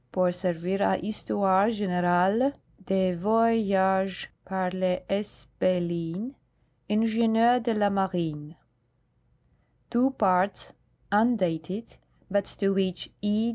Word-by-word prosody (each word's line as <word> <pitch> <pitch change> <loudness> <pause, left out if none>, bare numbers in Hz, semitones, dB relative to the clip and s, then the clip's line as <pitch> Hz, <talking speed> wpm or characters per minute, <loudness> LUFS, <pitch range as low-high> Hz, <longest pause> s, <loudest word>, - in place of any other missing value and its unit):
Pour 180 -1 +1
servir 180 +1 -2
a 190 - +2
Histoire 200 0 +1
generale 195 +4 +1 0.3
des 190 -1 +1
Voyages 195 -2 +1
par 185 -1 -2
le 185 -1 0
S. 200 +1 -4
Bellin, 175 +4 -1 0.6
Ing. 210 +1 +2 0.6
de 235 0 -1
la 210 -2 +2
Marine," 170 -6 -2 1.4
two 250 +2 +3
parts, 190 -5 0 0.4
undated, 200 -3 0 0.3
but 200 0 +1
to 195 -1 -1
which 190 -2 -2
E. 210 +3 +1
190 Hz, 95 wpm, -27 LUFS, 180-210 Hz, 1.4 s, two